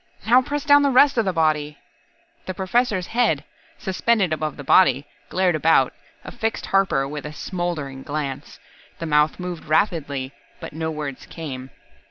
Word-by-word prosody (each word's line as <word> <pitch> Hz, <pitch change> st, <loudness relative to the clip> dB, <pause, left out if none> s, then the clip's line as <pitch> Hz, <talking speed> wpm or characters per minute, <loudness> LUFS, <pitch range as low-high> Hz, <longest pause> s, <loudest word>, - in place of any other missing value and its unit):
Now 245 Hz, +4 st, +6 dB
press 290 Hz, +2 st, -3 dB
down 290 Hz, 0 st, +6 dB
the 285 Hz, -, +3 dB
rest 270 Hz, 0 st, +5 dB
of 225 Hz, -, +1 dB
the 190 Hz, -, +1 dB
body." 155 Hz, -3 st, 0 dB, 0.7 s
The 185 Hz, -, -4 dB
Professor's 195 Hz, 0 st, 0 dB
head, 240 Hz, +5 st, +1 dB, 0.3 s
suspended 190 Hz, -2 st, +1 dB
above 155 Hz, -1 st, -3 dB
the 145 Hz, -, -7 dB
body, 140 Hz, -3 st, +4 dB, 0.2 s
glared 185 Hz, -1 st, +2 dB
about, 155 Hz, -4 st, +3 dB, 0.3 s
affixed 225 Hz, -2 st, -3 dB
Harper 190 Hz, -9 st, +1 dB
with 150 Hz, +1 st, -6 dB
a 150 Hz, -, -7 dB
smouldering 155 Hz, -6 st, -4 dB
glance. 145 Hz, -1 st, -5 dB, 0.4 s
The 165 Hz, -, -5 dB
mouth 150 Hz, +1 st, +2 dB
moved 180 Hz, -2 st, -6 dB
rapidly, 150 Hz, -5 st, 0 dB, 0.3 s
but -, -, -8 dB
no 160 Hz, +1 st, -3 dB
words 150 Hz, -4 st, -6 dB
came. 135 Hz, -6 st, -7 dB
160 Hz, 155 wpm, -22 LUFS, 150-195 Hz, 0.7 s, Now